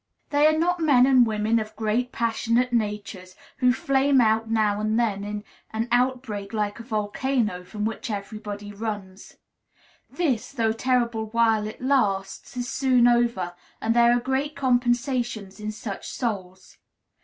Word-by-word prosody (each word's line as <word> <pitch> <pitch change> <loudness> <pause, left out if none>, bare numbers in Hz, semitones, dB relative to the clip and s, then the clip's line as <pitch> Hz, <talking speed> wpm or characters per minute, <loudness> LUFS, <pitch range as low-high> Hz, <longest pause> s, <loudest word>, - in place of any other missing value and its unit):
They 290 +1 +5
are 310 0 +3
not 355 +2 +1
men 280 -6 +5
and 260 -3 +5
women 220 +1 +1
of 215 0 -6
great 230 +3 -1
passionate 235 +1 0
natures, 205 -4 -3 0.2
who 250 -1 +4
flame 270 +2 +2
out 225 -1 +2
now 215 -2 +1
and 215 +2 +1
then 205 -4 0
in 205 0 -5 0.3
an 225 +2 -2
outbreak 245 -5 0
like 210 0 -2
a - - -7
volcano, 215 -2 -1
from 210 +3 -5
which 225 +1 -4
everybody 205 0 -6
runs. 205 -3 -6 0.7
This, 280 -11 -1
though 225 -4 +1
terrible 235 -2 0
while 220 -1 +2
it 215 - -9
lasts, 205 -6 0
is 245 0 -2
soon 255 -2 +3
over, 235 -7 +1 0.3
and 225 +1 0
there 235 0 +6
are 240 - +3
great 265 +4 -2
compensations 245 -5 0
in 210 0 -4
such 210 -2 -6
souls. 190 -6 -5
225 Hz, 150 wpm, -25 LUFS, 210-250 Hz, 0.7 s, there